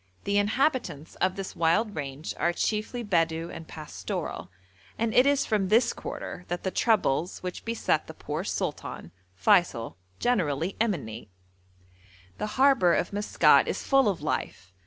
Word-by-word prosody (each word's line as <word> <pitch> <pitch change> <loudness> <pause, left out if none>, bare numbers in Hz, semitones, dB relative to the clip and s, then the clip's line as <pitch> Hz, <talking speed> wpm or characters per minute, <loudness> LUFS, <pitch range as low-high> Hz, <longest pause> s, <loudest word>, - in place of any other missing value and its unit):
The 200 0 +2
inhabitants 215 - 0
of 185 0 +1
this 195 -1 -6
wild 205 +6 +2
range 140 +1 -5
are 170 - +2
chiefly 215 +6 -2
Bedou 165 -4 0
and 160 - -9
pastoral, 155 -1 -5 0.5
and 225 0 0
it 255 +2 +6
is 285 -1 +3
from 210 -4 +1
this 230 +4 +3
quarter 180 - -7
that 175 0 -4
the 190 - -1
troubles 185 - +1
which 180 0 -5
beset 230 0 0
the - - -9
poor - - -4
sultan, 85 - -4 0.2
Feysul, 130 - +2 0.2
generally 175 - 0
emanate. 120 - -2 1.1
The - - -1
harbour 260 -10 +5
of 180 - -1
Maskat 205 +1 +4
is - - -3
full 270 -5 +4
of 180 -6 -3
life. 95 -10 -3
190 Hz, 145 wpm, -27 LUFS, 160-225 Hz, 1.1 s, it